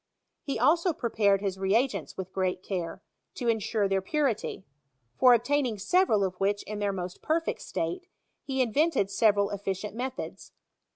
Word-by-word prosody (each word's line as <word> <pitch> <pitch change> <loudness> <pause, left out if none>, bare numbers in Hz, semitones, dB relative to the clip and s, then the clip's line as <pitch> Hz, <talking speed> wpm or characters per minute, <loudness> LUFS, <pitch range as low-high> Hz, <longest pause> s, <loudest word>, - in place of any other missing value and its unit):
He 275 - -3
also 335 +9 +3
prepared 210 -7 +1
his 195 -2 -2
reagents 200 - 0
with 190 -1 -6
great 185 -1 -1
care, 185 0 -4 0.3
to 245 - -3
ensure 220 -2 +1
their 195 0 +1
purity; 250 -4 -1 0.5
for 250 -1 +7
obtaining 245 -1 0
several 220 - +3
of 190 -2 -1
which 205 +1 +1
in 210 0 -6
their 205 -1 0
most 180 -2 -6
perfect 325 +2 -1
state, 365 0 -3 0.4
he 265 -1 +1
invented 250 - +1
several 205 -1 +3
efficient 200 0 -3
methods. 255 +2 -6
210 Hz, 150 wpm, -28 LUFS, 195-260 Hz, 0.5 s, for